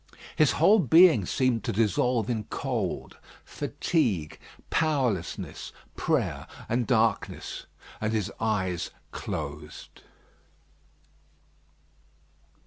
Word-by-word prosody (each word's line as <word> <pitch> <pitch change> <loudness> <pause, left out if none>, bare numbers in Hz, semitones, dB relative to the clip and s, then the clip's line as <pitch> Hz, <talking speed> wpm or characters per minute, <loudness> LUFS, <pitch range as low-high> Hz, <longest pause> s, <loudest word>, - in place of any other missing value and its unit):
His 155 -3 +4
whole 195 +8 +5
being 160 - +6
seemed 125 -5 +1
to - - 0
dissolve 115 +2 +1
in 110 -4 -2
cold, - - -3 0.3
fatigue, 105 - -1 0.3
powerlessness, 130 - -1 0.2
prayer, - - -1 0.2
and 120 0 0
darkness, 115 -3 0 0.3
and 110 0 0
his 110 -4 -1
eyes 95 -6 -1 0.2
closed. - - -7
115 Hz, 80 wpm, -27 LUFS, 105-140 Hz, 0.3 s, being